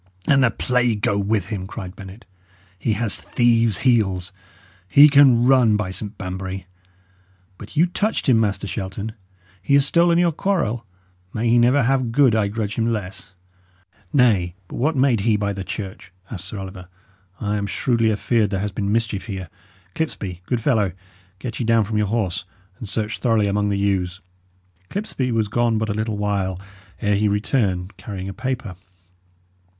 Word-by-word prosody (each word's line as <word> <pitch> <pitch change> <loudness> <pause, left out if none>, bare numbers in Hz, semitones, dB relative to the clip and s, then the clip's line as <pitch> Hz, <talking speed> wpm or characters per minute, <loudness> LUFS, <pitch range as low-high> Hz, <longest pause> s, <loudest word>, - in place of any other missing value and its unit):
"And 135 -2 +4
the 120 - +5
plague 120 -1 0
go 105 - +2
with 100 -1 0
him!" 95 -4 -4
cried 95 -1 -7
Bennet. 100 +2 -11 0.5
"He 110 - 0
has 110 0 0
thieves' 115 -4 +2
heels; 100 -7 +2 0.6
he 145 +9 +8
can 140 -5 +6
run, 125 -5 +5
by 100 -3 -3
St 105 +2 -4
Banbury! 95 +1 -5 0.9
But 105 +8 -11
you 165 - +6
touched 205 +3 -1
him, 120 -4 +5
Master 100 -3 0
Shelton; 100 +1 -4 0.5
he 140 +9 +2
has 140 -1 +5
stolen 170 +3 +3
your 175 -1 +3
quarrel, 145 - -1 0.5
may 115 +1 0
he 120 +1 +4
never 125 +4 +4
have 130 -1 +1
good 130 -1 +4
I 110 -2 +2
grudge 105 0 -3
him 115 +1 +1
less!" 100 -3 -5 0.8
"Nay, 100 -10 +3
but - - -8
what 150 +5 +1
made 130 -4 +3
he 105 +1 +2
by 100 -1 -1
the 95 -1 -5
church?" 95 -2 -7 0.2
asked 95 -5 -5
Sir 100 - -7
Oliver. 95 -1 -8 0.5
"I 105 -1 -1
am 100 0 -2
shrewdly 115 0 +1
afeared 110 0 +1
there 95 -1 -2
has 105 +1 -2
been 100 +1 -2
mischief 110 -2 -1
here. 95 -4 -5 0.4
Clipsby, 95 - -4
good 120 -2 -1
fellow, 110 - +1 0.4
get 120 +3 -6
ye - - 0
down 115 -1 +3
from 105 +1 -2
your 105 - +1
horse, 100 -4 -1 0.4
and 110 - -7
search 105 0 -2
thoroughly 115 -4 +2
among 105 +1 0
the 100 - 0
yews." 95 -2 0 0.7
Clipsby 165 - -2
was 110 -2 +1
gone 115 +1 +1
but 110 0 -1
a - - 0
little 110 0 -2
while 100 -3 -1 0.4
ere 105 -1 +2
he 105 +1 +2
returned 100 -3 0
carrying 95 -1 -6
a 95 - -5
paper. 125 -3 -4
105 Hz, 175 wpm, -22 LUFS, 100-120 Hz, 0.9 s, he